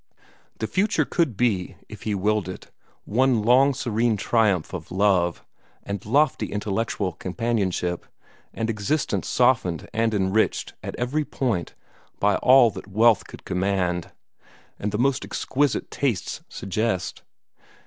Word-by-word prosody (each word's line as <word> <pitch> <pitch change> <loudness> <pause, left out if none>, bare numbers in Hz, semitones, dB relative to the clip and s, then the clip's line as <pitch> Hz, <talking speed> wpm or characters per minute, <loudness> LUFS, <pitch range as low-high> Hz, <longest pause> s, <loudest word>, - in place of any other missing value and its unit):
The - - -2
future 195 - +1
could 160 - 0
be, 105 -7 0
if - - -11
he 105 -2 -1
willed 105 -1 0
it, 90 - -9 0.3
one 125 0 +2
long 130 +5 +5
serene 115 -2 0
triumph 100 -6 +1
of 85 -2 -6
love, 95 -3 +1 0.4
and 100 -2 -5
lofty 140 +6 +2
intellectual 105 -2 -2
companionship, 95 -2 -2 0.4
and 115 - -3
existence 115 +8 -1
softened 115 - +2
and 115 0 +1
enriched 95 +2 +1
at - - -6
every 135 +5 -1
point 120 -11 -2 0.4
by 100 0 +3
all 125 -3 +6
that - - -9
wealth 110 +3 +3
could - - -12
command, 90 -2 -1 0.7
and 105 - -2
the 105 - -1
most 135 +2 +1
exquisite 140 -1 -1
tastes 120 -9 -2
suggest. 95 -1 -2
110 Hz, 130 wpm, -24 LUFS, 95-120 Hz, 0.7 s, all